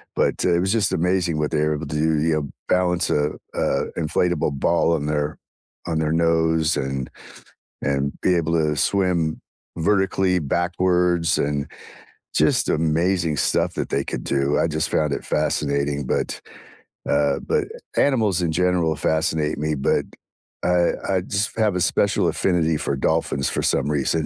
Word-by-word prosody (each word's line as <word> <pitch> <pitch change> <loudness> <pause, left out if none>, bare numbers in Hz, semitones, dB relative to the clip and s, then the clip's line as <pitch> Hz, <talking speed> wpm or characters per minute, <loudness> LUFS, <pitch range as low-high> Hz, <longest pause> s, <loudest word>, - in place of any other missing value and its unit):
but, - - 0
uh, 90 - +3
it 85 - +2
was 95 +2 0
just 110 -3 +1
amazing 90 -2 +1
what 75 -1 -1
they 80 - 0
were 75 0 +1
able 75 0 -5
to 75 - -5
do, 80 0 +1
you 80 +1 +2
know, 75 -3 -2 0.2
balance, 90 -1 +1
uh 75 +1 +1 0.2
uh, - - 0
inflatable 80 -1 0
ball 85 +4 +2
on 75 -3 -1
their 75 0 -1 0.5
on 80 -2 -1
their 80 0 0
nose, 80 -1 +2
and 65 -1 -3 0.7
and 70 0 0
be 90 -1 +2
able 80 -1 0
to 75 -2 +1
swim 85 -2 +1 0.4
vertically 95 0 +2
backwards, 90 +1 +1
and 70 0 -1 0.7
just - - +2
amazing 80 +1 +1
stuff - - +1
that - - -3
they - - 0
could - - -5
do, 70 +1 0
I - - +2
just 80 0 -1
found 75 -2 +1
it - - -4
fascinating, 70 0 0
but, - - -2 0.7
uh 70 -1 +2
but - - +1 0.3
animals 110 -10 +2
in 85 -2 0
general 85 -1 +1
fascinate 80 0 0
me, 75 +1 -1
but 70 - +1 0.6
I 90 -1 +3 0.2
I 95 -2 +2
just 100 +3 -2
have 105 -4 +2
a 90 - 0
special - - +2
affinity 85 -4 +1
for 70 - -2
dolphins 70 0 0
for - - -1
some - - +1
reason. 75 +2 0
80 Hz, 165 wpm, -22 LUFS, 75-90 Hz, 0.7 s, uh